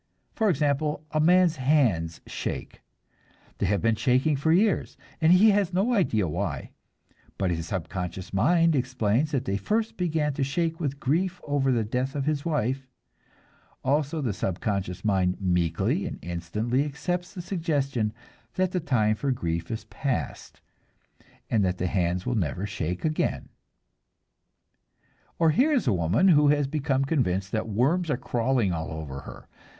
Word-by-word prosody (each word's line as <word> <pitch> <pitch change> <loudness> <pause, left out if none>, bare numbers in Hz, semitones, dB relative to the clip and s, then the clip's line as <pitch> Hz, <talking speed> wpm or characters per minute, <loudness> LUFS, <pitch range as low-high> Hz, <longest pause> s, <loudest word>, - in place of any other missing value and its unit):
For 220 -2 +1
example, 150 -1 0
a 155 - 0
man's 175 +1 +4
hands 125 - +1
shake; - - -5 0.8
they 100 - +1
have 100 +2 0
been 115 0 +3
shaking 130 +5 +2
for 140 +4 +1
years, 195 +4 +2 0.2
and 160 +1 +5
he 205 +4 +7
has 200 -3 +1
no 210 +7 +2
idea 110 - +2
why, 75 - -3 0.7
but 95 -2 0
his 85 -1 -3
subconscious 90 +1 -5
mind 165 - +3
explains 130 +1 +1
that 135 -4 -1
they 100 -5 0
first 220 - -1
began 155 -4 0
to 140 - -1
shake 165 +4 -1
with 140 -4 -3
grief 175 +7 0
over 140 -2 +1
the 120 -3 +2
death 125 +6 -2
of 140 -2 -1
his 150 -2 0
wife; 135 -4 -1 1.0
also, 145 +3 0
the 120 -7 -1
subconscious 95 0 -3
mind 95 -3 +1
meekly 95 - 0
and - - -6
instantly 105 +10 -1
accepts 175 +6 -3
the 180 - -4
suggestion 145 - -1 0.4
that 185 -1 +1
the 180 - 0
time 115 -9 +2
for 140 +6 -2
grief 85 -8 -2
is 115 -1 -4
past, 135 -4 -4 0.9
and 110 -3 +2
that 90 -1 0
the 90 - -2
hands 90 0 0
will 125 - 0
never 90 - -1
shake 90 - -3
again. 155 0 -1 1.9
Or 165 -1 +4
here 265 - +3
is 275 -5 +2
a 120 - +3
woman 90 - +3
who 150 -3 +5
has 145 0 +3
become 135 -1 0
convinced 95 - 0
that 110 0 -2
worms 150 - +1
are 140 - +1
crawling 120 -6 0
all 80 -1 -3
over 75 -4 -6
her. - - -11
130 Hz, 155 wpm, -26 LUFS, 95-155 Hz, 1.9 s, he